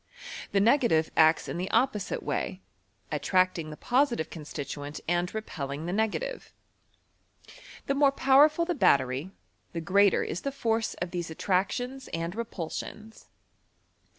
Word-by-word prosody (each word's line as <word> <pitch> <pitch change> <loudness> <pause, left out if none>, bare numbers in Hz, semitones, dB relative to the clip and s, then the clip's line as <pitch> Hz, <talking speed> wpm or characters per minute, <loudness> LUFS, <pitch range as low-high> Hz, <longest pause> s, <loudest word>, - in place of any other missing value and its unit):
The 200 - +3
negative 210 - +3
acts 160 0 +4
in - - -4
the 185 - -3
oppo 255 +4 +4
wte 200 - -4
way, 90 - -2 0.5
attracting 165 +2 +1
the 150 - -8
positive 245 - +1
constituent 145 -2 -6
and 175 +1 0
re 220 - -3
pelling 145 -6 -5
the 175 - -2
negative. 350 - -2 1.3
The 275 - 0
more 280 0 +4
powerful 285 +5 +4
the 350 - 0
bat 255 - +5
tery, 130 +6 -4 0.4
the 170 - -2
greater 200 +3 +4
is 175 - -4
the 275 - -2
force 225 -4 -1
of 175 0 -4
these 175 -2 -3
attractions 205 +10 -1
aad 165 +1 -3
repulsions. 220 0 -6
190 Hz, 140 wpm, -28 LUFS, 160-245 Hz, 1.3 s, bat